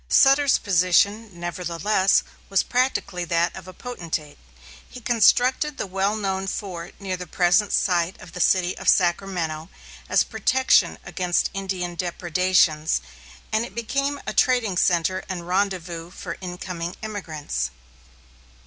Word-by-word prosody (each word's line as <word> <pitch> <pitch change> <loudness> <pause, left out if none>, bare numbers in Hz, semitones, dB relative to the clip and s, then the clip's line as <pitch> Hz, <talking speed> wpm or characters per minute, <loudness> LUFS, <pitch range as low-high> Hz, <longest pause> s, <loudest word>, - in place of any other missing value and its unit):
Sutter's 275 0 +5
position, 200 +4 +2
nevertheless, 175 +3 +1 0.3
was 195 -1 +3
practically 245 -8 -1
that 170 +1 +1
of - - -10
a - - -8
potentate. 170 - -6 0.5
He 250 - -10
constructed 250 +5 +3
the - - -2
well 195 +2 0
known 195 -2 -2
fort 180 -4 -5
near 195 -2 -3
the 180 0 -7
present 180 +5 +2
site 175 -1 +1
of 165 - -12
the 180 - -8
city 185 0 +3
of 195 - +1
Sacramento, 170 -3 +1 0.4
as - - +4
protection 255 +4 +2
against 180 -3 0
Indian 190 -3 -3
depredations, 175 - +1 0.5
and 220 +1 +1
it 205 -4 -9
became 275 +5 -1
a - - -3
trading 245 -7 +2
centre 180 +1 +1
and 175 -2 -5
rendezvous 180 -3 -1
for 175 -1 -7
incoming 180 -1 -5
emigrants. 180 -9 -4
185 Hz, 130 wpm, -23 LUFS, 175-210 Hz, 0.5 s, Sutter's